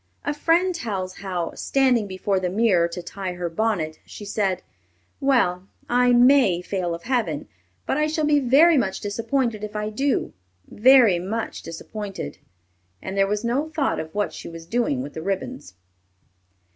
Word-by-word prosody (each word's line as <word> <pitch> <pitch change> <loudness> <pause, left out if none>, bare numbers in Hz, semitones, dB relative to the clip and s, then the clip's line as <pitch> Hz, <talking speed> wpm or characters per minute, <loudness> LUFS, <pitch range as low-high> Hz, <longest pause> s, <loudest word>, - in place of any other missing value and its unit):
A 290 - 0
friend 335 +5 +2
tells 195 - -4
how, 180 -3 -3
standing 255 -6 +1
before 190 +1 -1
the 185 -1 -1
mirror 190 -4 +3
to 170 +1 -7
tie 190 -1 -5
her 175 -1 -4
bonnet, 165 -5 -1
she 205 - -10
said, 200 -2 -1 0.6
"Well, 195 -10 +1 0.2
I 245 0 +3
may 245 -7 +5
fail 180 -2 -2
of 170 - -11
Heaven, 220 - -1 0.4
but - - 0
I 305 0 +2
shall 310 0 0
be 295 -1 +4
very 285 +5 +5
much 190 -5 -1
disappointed 230 +1 -1
if 210 0 -6
I 210 0 -2
do 270 +5 0 0.3
very 235 -5 +5
much 215 +6 -4
disappointed;" 195 - -7 0.6
and 190 - -6
there 195 0 +3
was 210 +2 -1
no 265 +7 0
thought 310 -3 -1
of 160 0 -7
what 205 0 -1
she - - -8
was 165 -1 -10
doing 175 - 0
with 145 - -8
the 160 - -6
ribbons. 195 - -4
210 Hz, 165 wpm, -23 LUFS, 180-255 Hz, 0.6 s, may